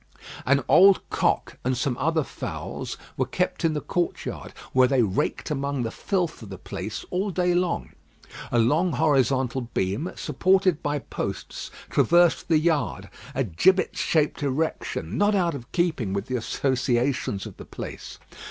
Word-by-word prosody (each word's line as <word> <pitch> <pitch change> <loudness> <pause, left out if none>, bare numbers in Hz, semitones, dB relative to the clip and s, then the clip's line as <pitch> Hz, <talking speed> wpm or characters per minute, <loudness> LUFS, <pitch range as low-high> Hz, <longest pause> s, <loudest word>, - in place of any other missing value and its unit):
An 140 0 +4
old 195 +1 +6
cock - - 0
and 130 0 0
some 130 0 0
other 160 +3 +1
fowls - - -6 0.2
were 130 - 0
kept 180 +5 -1
in 165 -1 +2
the 150 - -1
courtyard, 175 -2 -3 0.2
where 130 0 +6
they 130 -2 +3
raked 100 - -1
among 140 -2 -1
the 115 - -3
filth 180 - -2
of 110 - -9
the 95 - -7
place 100 +3 -6
all 190 +3 0
day 180 -1 +1
long. 175 -1 0 0.6
A 120 - +2
long 150 +9 +3
horizontal 135 -3 +2
beam, 100 - -1
supported 185 +3 +2
by 145 0 -1
posts, 140 - -5 0.2
traversed 175 0 +4
the 160 - +4
yard 150 - 0 0.2
a 135 - +1
gibbet 180 - +2
shaped 155 -2 +1
erection, 140 - -2
not 205 0 +3
out 175 -4 +2
of 125 -4 -8
keeping 155 - 0
with 100 0 -2
the 130 - -3
associations 125 -3 0
of - - -9
the - - -10
place. - - -8
140 Hz, 155 wpm, -25 LUFS, 125-175 Hz, 0.6 s, old